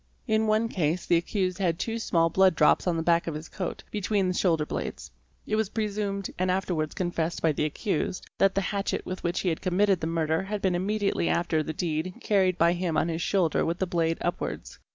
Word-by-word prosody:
In 220 -1 +1
one 215 +2 +2
case 170 -4 -1
the 175 - +3
accused 185 +1 -1
had 170 -4 +1
two 225 +4 -2
small 165 -6 +2
blood 190 0 +4
drops 155 - +4
on 170 -2 +1
the 165 - -1
back 170 0 +2
of 160 - -2
his 155 +1 -6
coat, 185 -2 -5
between 205 -1 0
the 180 - 0
shoulder 165 -4 +2
blades. 70 - -5 0.3
It 215 - -1
was 220 -2 0
presumed, 205 -3 -2
and 185 0 +1
afterwards 180 -5 -1
confessed 175 -2 -1
by 160 - +4
the 150 +1 -1
accused, 190 +4 -2
that 195 0 +4
the 195 - +2
hatchet 200 +1 -2
with 185 - -5
which 175 0 0
he 185 - +1
had 160 - -2
committed 190 0 +2
the 160 - -1
murder 160 -1 0
had 205 +2 -3
been 190 -2 +1
immediately 195 0 0
after 170 -2 +1
the 155 - -3
deed 160 +2 -2
carried 190 -3 +2
by 170 0 +4
him 175 -2 -1
on 170 - +1
his 165 0 -2
shoulder 175 -4 +1
with 170 +1 -1
the 190 - 0
blade 165 -2 0
upwards. 175 - -4
180 Hz, 220 wpm, -27 LUFS, 165-195 Hz, 0.3 s, blood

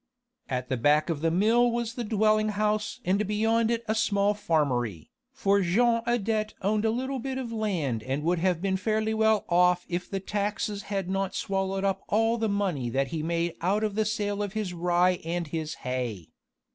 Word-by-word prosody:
At 125 -1 -2
the 130 - -1
back 150 +6 +3
of 150 -3 -3
the 165 - +2
mill 225 +8 +3
was 235 -1 -2
the 240 - -4
dwelling 215 0 +2
house 210 +3 -1
and 195 +3 +1
beyond 225 +2 +2
it 235 0 0
a 215 - +1
small 205 -2 +2
farmery, 140 - -1 0.2
for 200 -7 +2
Jean 230 +6 +3
Adet 220 -2 0
owned 210 +2 +1
a - - +3
little 260 +4 -2
bit 265 +2 -4
of 250 -3 -4
land 180 - -1
and 135 +5 -3
would 175 +1 +1
have 180 0 0
been 190 -1 +1
fairly 220 +2 0
well 220 -1 +2
off 180 0 +3
if 180 0 -3
the 195 - -2
taxes 205 +1 -2
had 195 -3 -2
not 195 0 -2
swallowed 195 0 -1
up 195 -1 0
all 225 +2 +2
the 220 -1 0
money 185 -12 -1
that 135 +3 0
he 165 -2 -3
made 170 +1 -1
out 200 +5 +1
of 215 -2 0
the 220 +2 +1
sale 205 -1 -1
of 205 -1 -3
his 210 -4 -3
rye 175 +1 +2
and 170 -1 -3
his 160 -1 -3
hay. 125 -9 -3
200 Hz, 195 wpm, -27 LUFS, 170-220 Hz, 0.2 s, back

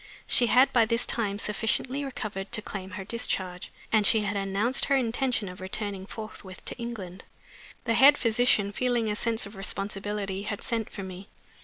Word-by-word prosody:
She 240 - +3
had 255 +3 +5
by 235 -2 +5
this 230 +1 +1
time 205 -4 0
sufficiently 225 +6 0
recovered 210 -7 -5
to 215 - +1
claim 190 -2 -5
her 195 - -5
discharge, 190 -5 -2 0.2
and 215 -1 +4
she 215 +2 +4
had 205 0 -2
announced 200 +6 +1
her 275 - +3
intention 245 -3 0
of 180 0 -9
returning 195 0 -4
forthwith 210 -4 -9
to - - -2
England. 205 -6 -6 0.6
The 230 - +2
head 280 +5 +7
physician, 225 -3 +3
feeling 240 -1 0
a - - -1
sense 230 +1 +1
of 200 +2 -10
responsibility, 195 0 -3
had 205 0 -4
sent 225 -2 -2
for 195 - -7
me. 190 +1 -9
210 Hz, 175 wpm, -28 LUFS, 195-235 Hz, 0.6 s, head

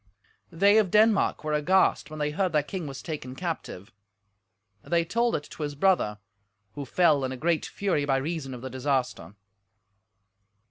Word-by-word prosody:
They 200 +5 +4
of 205 -4 +1
Denmark 215 -2 +3
were 155 0 -2
aghast 175 +6 +2
when 155 - -8
they 150 0 -1
heard 180 +2 -1
their 150 -2 +3
king 175 +1 -5
was 135 -1 -8
taken 145 -6 -6
captive; 135 - -5 0.9
they 170 +3 0
told 235 +6 +1
it 145 - -3
to - - -9
his 145 -1 -3
brother, 145 - +2 0.6
who 145 - -6
fell 150 0 +3
in 130 - -2
a 130 - -5
great 165 +3 0
fury 190 -7 -1
by 135 -1 +2
reason 135 -2 -4
of 125 - -10
the 130 - -5
disaster. 130 -5 -2
150 Hz, 170 wpm, -27 LUFS, 135-180 Hz, 0.9 s, They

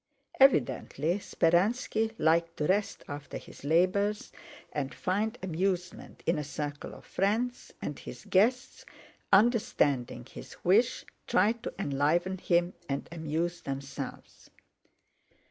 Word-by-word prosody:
Evidently 170 - +3
Speránski 220 +6 +1
liked 165 +1 +2
to 150 - 0
rest 200 +5 0
after 145 0 -6
his - - -13
labors 185 +7 +2 0.4
and 140 -2 -3
find 215 +5 -1
amusement 180 0 -2
in 165 -1 +2
a - - -2
circle 145 0 -5
of - - -14
friends, 230 +6 -1
and 145 - -4
his 125 - -10
guests, 245 +7 +2 0.5
understanding 170 - +3
his - - -11
wish, 215 +8 +3 0.2
tried 225 +3 +2
to - - -5
enliven 170 +3 +1
him 175 0 +2 0.2
and 140 0 -2
amuse 170 +1 -2
themselves. 135 0 -7
175 Hz, 110 wpm, -30 LUFS, 150-205 Hz, 0.5 s, Evidently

